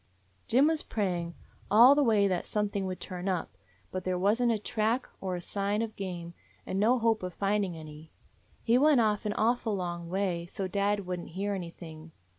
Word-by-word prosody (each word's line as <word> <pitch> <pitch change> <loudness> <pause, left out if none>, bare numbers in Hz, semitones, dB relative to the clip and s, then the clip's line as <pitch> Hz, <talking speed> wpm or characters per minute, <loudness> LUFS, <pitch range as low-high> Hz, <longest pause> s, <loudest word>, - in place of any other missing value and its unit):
"Jim 260 +4 +4
was 320 0 +2
praying 175 -5 -2 0.3
all 235 +6 +8
the 290 - +3
way 215 -6 +4
that 180 -2 -1
some 210 -1 0
thing 200 -1 -3
would 185 -1 -5
turn 185 0 -4
up, 175 - -2 0.4
but 185 0 -4
there 185 0 -1
was 205 +6 +2
n't 240 -1 +3
a 225 - +1
track 220 +4 -1
or 185 -1 -2
a 175 - -5
sign 200 +4 -1
of 220 -1 -6
game, 175 -3 -6 0.3
and 190 - -2
no 235 +5 +4
hope 225 -2 +1
of 180 -1 -5
finding 200 -3 0
any. 155 0 -11 0.5
He 235 +2 +4
went 295 -2 +5
off 215 -1 +1
an 205 - -1
awful 225 -1 +1
long 175 -2 -4
way, 180 -2 -1
so 190 +1 -4
dad 200 +1 0
would 180 0 -3
n't - - -9
hear 200 +4 -2
anything. 165 -3 -8
200 Hz, 205 wpm, -29 LUFS, 180-220 Hz, 0.5 s, all